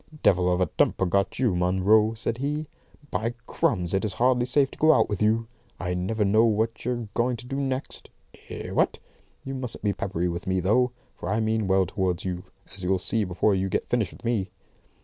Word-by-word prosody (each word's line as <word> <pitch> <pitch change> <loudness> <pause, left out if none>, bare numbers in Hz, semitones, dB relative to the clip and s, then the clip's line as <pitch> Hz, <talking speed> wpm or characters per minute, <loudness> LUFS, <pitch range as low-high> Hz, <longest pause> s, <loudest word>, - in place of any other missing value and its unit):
"Devil 90 -1 +4
of 90 - +1
a 90 - +3
temper 90 +3 +1
you've 90 - -3
got, 100 +4 +1
Munro," 105 +1 +3
said 115 +1 -2
he. 150 +3 -2 0.5
"By 115 +2 -1
Crums, 90 -5 0
it's 95 +1 0
hardly 125 0 +2
safe 135 +2 +2
to - - -12
go 155 0 +6
out - - +3
with 105 -1 -3
you. 110 +2 +2 0.3
I 90 0 -2
never 100 +4 0
know 110 +3 +4
what 110 0 +1
you're 120 -2 -2
going 120 +1 +1
to 120 - -11
do 135 +2 -4
next. 135 -1 -4 0.4
Eh, - - -6
what? - - +1 0.5
You 135 - -4
mustn't 130 -5 -5
be 100 -1 +2
peppery 90 -3 -2
with 85 +3 -4
me, 95 0 +1
though; 110 +8 +3 0.3
for 85 - -6
I 105 +2 +1
mean 110 -1 0
well 95 0 +3
towards 90 -1 -2
you, 90 0 -4 0.3
as 95 -1 -10
you'll 95 +1 +2
see 110 +4 0
before 90 +3 +1
you 95 0 0
get - - -2
finished 110 -7 0
with 120 - -14
me." 110 -5 0
105 Hz, 210 wpm, -26 LUFS, 95-120 Hz, 0.5 s, go